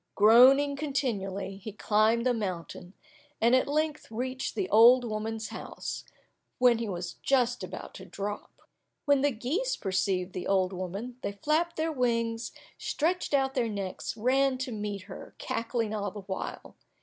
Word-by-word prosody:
Groaning 260 +7 +7
continually, 205 -10 -2
he 210 +2 -7
climbed 215 +3 +2
the 250 - +3
mountain, 185 -4 -5 0.5
and 235 +2 +4
at 260 - +2
length 305 +1 -1
reached 255 +3 -3
the 380 - -1
old 240 +3 +7
woman's 220 0 -3
house, - - -6 0.5
when 245 -2 +4
he 230 -2 -3
was 175 -2 -4
just 250 -2 +1
about - - -7
to - - -10
drop. 205 +1 -6 0.4
When 285 -2 +4
the 290 - +4
geese 290 - -1
perceived 190 -1 -1
the 180 - -4
old 190 -1 +2
woman, 195 +7 -5
they 200 - -3
flapped 310 - 0
their 320 +1 -1
wings, 230 -4 -1 0.3
stretched 330 -1 0
out 270 -1 +1
their 240 -3 0
necks, 200 +1 -4
ran 260 +3 +2
to 255 0 -4
meet 205 -3 -4
her, 190 -1 -11
cackling 230 -2 -2
all 205 -1 -2
the 205 +2 -8
while. 190 0 -6
230 Hz, 155 wpm, -29 LUFS, 200-265 Hz, 0.5 s, Groaning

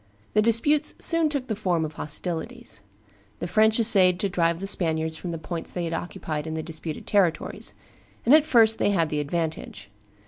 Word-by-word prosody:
The 215 - +4
disputes 235 +7 +2
soon 330 -2 +3
took 280 -4 -2
the 220 - -3
form 180 -6 -1
of 155 - -7
hostilities. 160 - -4 0.6
The - - -5
French 220 +4 +3
essayed 190 -6 +4
to 200 - 0
drive 170 -2 0
the 195 - -5
Spaniards 160 -4 0
from 175 +3 -7
the 165 - -4
points 160 +1 -4
they 175 - -4
had 165 -1 -3
occupied 155 -3 -5
in 160 - -4
the 160 - -4
disputed 160 -1 -5
territories; 190 -5 0 0.5
and 250 - +5
at 310 -1 +7
first 225 -7 +4
they - - +2
had 170 -6 +1
the 150 - -2
advantage. 150 -10 -4
175 Hz, 185 wpm, -25 LUFS, 160-220 Hz, 0.6 s, at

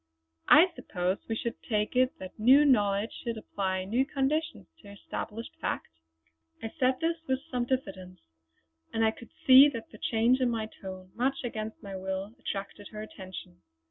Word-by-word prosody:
"I 345 +4 +7
suppose 180 +1 -2
we 225 - 0
should 235 +1 -4
take 210 +1 -1
it 255 +1 +2
that 185 +3 -10
new 265 +7 +7
knowledge 205 -5 +2
should 235 -2 -3
apply 190 -3 -2
new 235 +7 +2
conditions 300 +3 -1
to 200 - -14
established 210 +2 -7
fact?" - - -2 0.7
I 225 - -6
said 255 -1 +2
this 330 +1 +1
with 260 0 0
some 245 -2 0
diffidence; 190 -8 -4 0.7
and 225 0 +1
I 220 - +4
could 235 +1 -13 0.2
see 265 +2 +9
that 230 -5 -7
the 215 - -13
change 235 +3 +2
in 250 - +3
my 225 -2 -1
tone, 185 -3 -10
much 265 +3 -1
against 220 -2 -5
my 195 -1 -7
will, 190 +2 -4
attracted 200 0 -5
her 215 0 -7
attention. 185 -4 -10
225 Hz, 170 wpm, -29 LUFS, 195-255 Hz, 0.7 s, see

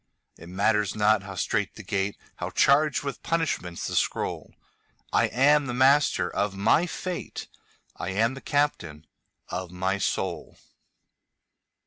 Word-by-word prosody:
It 85 - -13
matters 105 +2 +1
not 105 -1 +3
how 100 0 -8
strait 105 +2 -1
the 110 - -9
gate, 100 +1 -2 0.2
How - - -4
charged 145 +1 +3
with 140 -2 -5
punishments 160 - -2
the - - -3
scroll,I - - -2
am 145 +2 +3
the 120 - -3
master 130 -8 +4
of 100 +1 -2
my 110 - +3
fate;I 180 - -7
am 110 +6 +1
the 135 - -9
captain 85 - -1 0.4
of 90 0 -4
my 95 +2 -1
soul. 95 -2 -2
105 Hz, 125 wpm, -26 LUFS, 95-140 Hz, 0.4 s, master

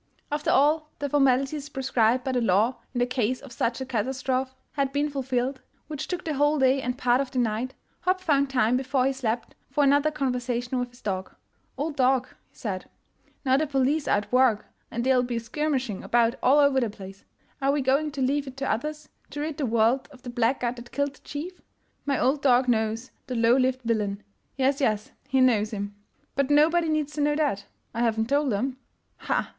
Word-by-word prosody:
After 295 0 -1
all 305 +2 +3
the 285 - -3
formalities 275 +1 +2
prescribed 255 -3 +1
by 265 - -1
the 250 -1 +1
law 220 +4 +2
in 255 - -6
the 245 - +3
case 250 0 -1
of 275 -3 -12
such 235 0 -1
a 265 - -3
catastrophe 260 +2 -1 0.2
had 275 -2 -1
been 290 +1 0
fulfilled, 260 -1 -2 0.2
which 300 -2 -5
took 360 - -4
the 315 - -1
whole 290 +2 +2
day 265 0 +3
and 250 0 -3
part 250 -1 +3
of 275 - -4
the 260 - -6
night, 240 +2 -1 0.2
Hopp 370 +1 +1
found 280 -6 +2
time 250 -3 +2
before 260 0 0
he 270 - +2
slept 235 -3 -3 0.2
for 285 +2 +1
another 285 +2 +4
conversation 250 -3 -2
with 245 0 -2
his 245 +1 -20
dog. 190 -3 -2
1 - - -28 0.2
' - - -42
Old 300 +1 -2
dog, 255 -1 +2
' - - -34
' - - -42
he - - -36
said, 190 -5 -5
' - - -43
' - - -37
now 260 0 +4
the 310 +2 0
police 275 +2 +1
are - - +4
at 205 - -5
work, 250 -4 +3 0.2
and 235 - -3
they'll 260 0 +4
be 245 -1 -2
skirmishing 260 -2 -2
about 235 -1 +3
all 265 +3 +5
over 280 -2 +5
the 235 -3 0
place. 195 -1 -11 0.4
Are 275 +1 +3
we 290 0 +1
going 275 +4 +2
to 275 -2 -1
leave 280 +2 0
it 265 0 -9
to 275 0 -1
others 300 +6 -3 0.2
to 290 - -7
rid 300 0 -3
the 280 - -1
world 230 +3 +2
of 255 -3 -16
the 245 - -6
black 240 +2 +1
guard 245 0 -1
that 240 0 -11
killed 285 0 -1
the - - -20
chief1? 335 +6 -7 0.5
My 275 -2 +1
old 270 +3 +2
dog 255 -1 +4
knows 225 +1 0 0.2
the 255 - -3
low 230 +1 +4
lived 260 0 +1
villain 210 -3 -1 0.2
— - - -44
yes, 270 +1 +1
yes, 215 -5 0 0.2
he 265 -1 +2
knows 220 -5 +3
him! 205 -1 -5 0.4
But 275 0 +1
nobody 320 +3 +4
needs 305 -1 0
to 300 - -2
know 295 0 +2
that 280 -11 0
— - - -45
I 230 - -4
haven't 225 -1 +1
told 285 -1 +2
'em. 250 +6 -1 0.4
Ha! - - -2
ha! - - -15
260 Hz, 225 wpm, -26 LUFS, 240-285 Hz, 0.5 s, all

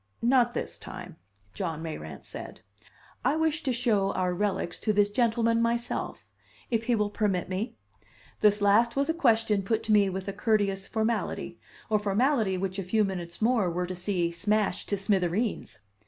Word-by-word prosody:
"Not 240 0 +3
this - - -3
time," - - -9 0.4
John 165 -4 -3
Mayrant 80 - -7
said. - - -8 0.6
"I 260 +5 +2
wish 320 0 +1
to 270 - -1
show 225 -5 +1
our 180 -1 0
relics 190 -2 -1
to 215 - +1
this 205 0 +3
gentleman 230 0 +2
myself 235 +1 -2 0.4
if 230 -1 0
he 240 0 +2
will 210 -1 0
permit 200 -5 0
me?" 195 +6 -3 0.6
This 205 -1 +3
last 220 +4 +4
was 280 +3 +1
a - - +3
question 225 -9 +2
put 220 +3 -1
to 220 - -2
me 205 -2 +5
with 190 +1 -5
a 200 - -2
courteous 200 -2 0
formality, 220 +1 -2 0.3
a 215 - +4
formality 210 0 +1
which 190 +1 -3
a - - -2
few 215 +4 +2
minutes 180 -1 -4
more 225 -6 +3
were 180 +1 -1
to 185 - -5
see 180 -2 -1
smashed 205 +2 0
to 200 - +1
smithereens. 195 +2 0
210 Hz, 170 wpm, -28 LUFS, 190-230 Hz, 0.6 s, me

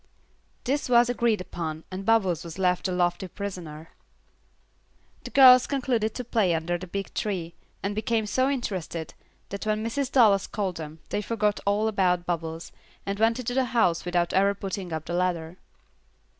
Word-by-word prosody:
This 275 +1 -1
was 240 0 +5
agreed 235 -4 +1
upon, 160 -3 -5
and 185 +1 -5
Bubbles 190 -8 +2
was 170 0 -8
left 180 0 +1
a - - -2
lofty 180 +1 0
prisoner. 170 -5 -7 1.3
The - - -5
girls 255 -2 +8
concluded 245 -6 -1
to 250 - -4
play 215 -7 +1
under 165 +2 -1
the 185 - -8
big 195 +2 -5
tree, 180 -5 -3 0.3
and 200 +1 -1
became 220 +1 0
so 255 +6 +1
interested, 185 - -4 0.4
that 200 +2 -5
when 215 +1 0
Mrs. 270 +3 -2
Dallas 210 -7 +4
called 195 -4 -3
them, 155 0 -8
they 205 - -1
forgot 210 -1 0
all 205 +2 +2
about 180 -4 +1
Bubbles, 165 -1 -4 0.3
and 200 +1 -3
went 225 +1 +3
into 245 -1 -3
the 265 0 +2
house 175 -7 +3
without 175 -1 0
ever 200 +1 +3
putting 195 -2 -5
up 160 -1 -4
the - - -5
ladder. 175 -1 -1
195 Hz, 170 wpm, -26 LUFS, 175-225 Hz, 1.3 s, girls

